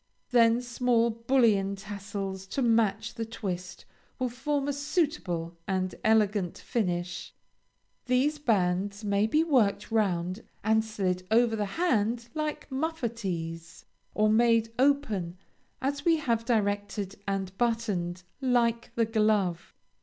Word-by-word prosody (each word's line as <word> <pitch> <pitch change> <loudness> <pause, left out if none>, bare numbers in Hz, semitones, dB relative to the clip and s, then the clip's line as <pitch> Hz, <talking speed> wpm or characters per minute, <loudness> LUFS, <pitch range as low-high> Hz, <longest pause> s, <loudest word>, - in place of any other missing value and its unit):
Then 235 0 +4
small 240 -1 +2
bullion 225 -4 +2
tassels 195 -1 -6
to 265 +7 -1
match 230 -3 +2
the 230 - -4
twist 190 -5 -5 0.3
will 255 -1 -1
form 280 +3 -2
a 285 - 0
suitable 270 - -1
and 185 -1 -1
elegant 210 -4 +2
finish. 175 -5 -3 0.7
These 270 +4 +2
bands 200 -4 0
may 200 +1 +2
be 305 +8 +3
worked 230 -10 +2
round 185 -3 0 0.2
and 220 +1 +3
slid 185 -4 -2
over 230 0 +4
the 210 -2 -1
hand 235 -8 +1
like 305 -1 -3
muffatees, 215 - -4 0.3
or 215 0 +3
made 225 0 +3
open 220 -11 +1 0.5
as 280 +1 -1
we 330 0 +4
have 235 -6 0
directed 205 -3 -1
and 195 -1 -2
buttoned, 205 -7 -1 0.2
like 235 -3 +1
the 230 - +3
glove. 210 -6 +1
220 Hz, 120 wpm, -28 LUFS, 195-245 Hz, 0.7 s, Then